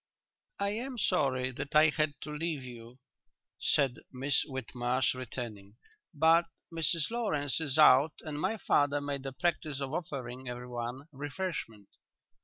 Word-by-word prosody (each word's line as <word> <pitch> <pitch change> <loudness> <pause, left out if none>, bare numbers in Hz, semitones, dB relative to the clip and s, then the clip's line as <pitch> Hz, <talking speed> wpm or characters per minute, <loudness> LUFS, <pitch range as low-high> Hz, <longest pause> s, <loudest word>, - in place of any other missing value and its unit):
"I 200 0 +1
am 245 +5 -4
sorry 130 - +1
that 140 +4 -6
I 155 +1 +7
had 155 -1 0
to 150 - -6
leave 155 -3 -2
you," 120 -1 -10 0.6
said 135 -5 +2
Miss 135 +2 +1
Whitmarsh, 125 -1 0
returning, 115 -5 -7 0.4
"but 165 +1 +5 0.3
Mrs 165 0 +1
Lawrence 160 - 0
is 145 -2 -1
out 150 0 +7
and 150 -1 -5
my 220 - 0
father 145 -6 +2
made 140 -1 -4
a - - -3
practice 155 -1 -1
of 135 0 -4
offering 130 -6 -4
everyone 125 +2 -5
refreshment." 140 - -5
140 Hz, 135 wpm, -31 LUFS, 125-155 Hz, 0.6 s, I